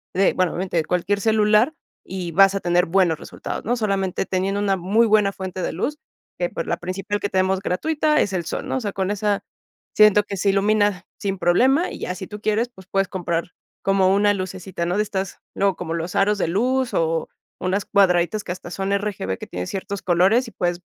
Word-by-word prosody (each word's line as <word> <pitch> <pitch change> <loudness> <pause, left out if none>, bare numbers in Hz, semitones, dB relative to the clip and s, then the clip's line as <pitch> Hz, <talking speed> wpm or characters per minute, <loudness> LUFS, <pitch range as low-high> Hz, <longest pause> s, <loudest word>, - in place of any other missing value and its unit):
de, 195 +1 +3
bueno, 185 -2 +1
obviamente, 180 -1 -2
de 160 - +1
cualquier 185 +3 0
celular 215 +5 +3 0.3
y 180 -2 -5
vas 195 +2 +6
a - - 0
tener 175 0 +2
buenos 175 -3 +2
resultados, - - -6
¿no? 240 +2 +1
Solamente 195 -4 -1
teniendo 195 +2 -1
una 195 -2 +1
muy 205 +6 +3
buena 210 -2 +4
fuente 185 -1 -6
de - - -1
luz, 295 - -2 0.4
que, 175 - 0
pues, - - -4
la 170 - 0
principal 195 +3 -3
que 205 - -2
tenemos 190 0 +1
gratuita 300 - +1
es 200 - 0
el 175 -3 -2
sol, - - -4
¿no? - - -1
O - - -3
sea, 205 -2 -3
con 190 0 -1
esa 205 0 0 0.5
siento 210 -1 +6
que 200 -1 -6
se 200 +2 +1
ilumina 205 -1 +2
sin 195 -1 -2
problema 260 - +3
y - - -8
ya 180 - -3
si 185 0 -7
tú 210 0 -9
quieres, 225 +3 +1
pues 190 -5 -16
puedes 195 -1 +1
comprar 175 -2 -2 0.3
como 195 -1 +3
una 205 +1 +4
lucecita, 185 -2 -4
¿no?, 180 +3 -1
de 210 - +3
estas 195 -2 -4 0.2
luego 195 -1 +2
como 165 -2 -5
los 170 +1 -4
aros 205 +1 +3
de - - +1
luz 250 +7 0
o 165 0 0 0.3
unas 190 +2 -1
cuadraditas 190 +1 +2
que - - -5
hasta 180 -1 -7
son 195 +1 -3
RGB 195 - -2
que - - -8
tienen 90 0 -5
ciertos 195 +1 -4
colores 190 +8 +3
y - - -9
puedes, 175 -2 -2
195 Hz, 215 wpm, -22 LUFS, 180-210 Hz, 0.5 s, vas